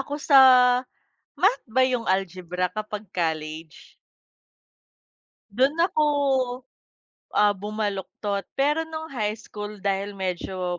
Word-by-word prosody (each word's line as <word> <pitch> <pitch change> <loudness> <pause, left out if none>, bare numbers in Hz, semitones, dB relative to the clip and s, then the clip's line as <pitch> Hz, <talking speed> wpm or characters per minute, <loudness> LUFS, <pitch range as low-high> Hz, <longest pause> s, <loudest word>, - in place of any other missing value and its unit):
ako 285 +2 -4
sa 275 - +6 0.9
Math 405 +7 +1
ba 245 +4 0
yung 255 -2 +2
algebra 185 -2 -1
kapag 210 +1 -6
college? 160 -2 -4 1.6
Dun 260 +8 +2
ako, 310 -4 +2 1.3
ah, 210 0 +5
bumaluktot 205 0 -3
pero 295 +4 +2
nung 320 -1 -7
high 215 -5 -2
school 210 -1 -8
dahil 200 +1 -1
medyo 180 -1 -3
205 Hz, 100 wpm, -24 LUFS, 185-255 Hz, 1.6 s, sa